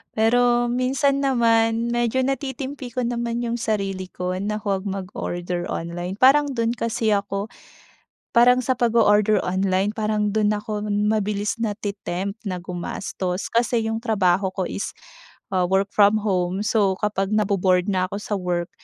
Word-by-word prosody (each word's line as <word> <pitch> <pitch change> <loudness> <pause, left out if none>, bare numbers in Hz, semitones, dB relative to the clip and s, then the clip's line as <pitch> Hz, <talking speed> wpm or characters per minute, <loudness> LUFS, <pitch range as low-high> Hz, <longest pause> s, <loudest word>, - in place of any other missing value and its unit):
Pero 240 +2 +3
minsan 270 +3 +1
naman 230 -3 +2
medyo 240 +2 +1
natitimpi 270 -1 -4
ko 250 - 0
naman 235 0 -2
'yung 235 0 -2
sarili 195 -4 -2
ko 180 0 -4
na 210 +2 -2
huwag 195 0 -1
mag-order 180 -2 -4
online, 175 +2 -4
parang 275 +4 +4
dun 230 -1 +1
kasi 230 -2 -1
ako 200 0 -1 0.8
parang 250 +2 +5
sa 255 0 0
pag-o-order 215 -3 +3
online 190 +1 0
parang 215 -1 -1
dun 210 0 +2
ako 210 0 -4
mabilis 210 0 0
nate-tempt 205 -3 -3
na 185 -3 -3
gumastos. 180 +1 -4
Kasi 230 -1 +1
'yung 225 - -1
trabaho 195 -5 +1
ko 190 -2 -2
is, 200 - -4 0.6
ah, 180 -2 +1
work 195 +2 +1
from 205 +1 +5
home, 185 0 0
so 205 -4 +2
kapag 195 -2 0
nabo-bored 190 -3 +2
na 185 -1 +1
ako 200 - -5
sa 205 +1 -6
work, 175 -1 -2
210 Hz, 145 wpm, -23 LUFS, 190-235 Hz, 0.8 s, parang